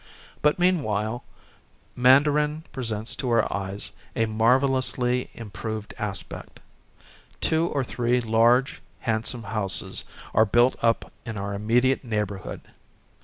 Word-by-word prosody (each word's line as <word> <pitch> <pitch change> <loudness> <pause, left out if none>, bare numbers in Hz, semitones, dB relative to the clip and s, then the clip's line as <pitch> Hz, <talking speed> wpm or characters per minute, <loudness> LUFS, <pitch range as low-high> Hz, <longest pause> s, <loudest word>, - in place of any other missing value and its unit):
But, 150 0 +3
meanwhile, 120 - 0 0.7
Man 130 +3 +6
darin 150 +1 0
presents 115 -3 -3
to 130 - -2
our 115 -2 +2
eyes 100 0 -4 0.2
a 115 - +2
marvellously 125 +2 +1
im 115 -3 -9
proved 110 +2 -5
aspect. 100 -5 -5 0.8
Two 160 +1 +2
or 140 -5 -1
three 120 0 0
large, 120 +3 +2 0.2
handsome 115 +1 -1
houses 100 -2 +2 0.3
are 110 - +5
built 120 +5 +4
up 115 -1 +1
in 115 -3 -6
our 100 +1 -4
immediate 120 +7 +1
neighbor 105 -4 -2
hood. - - -8
115 Hz, 120 wpm, -25 LUFS, 110-130 Hz, 0.8 s, Man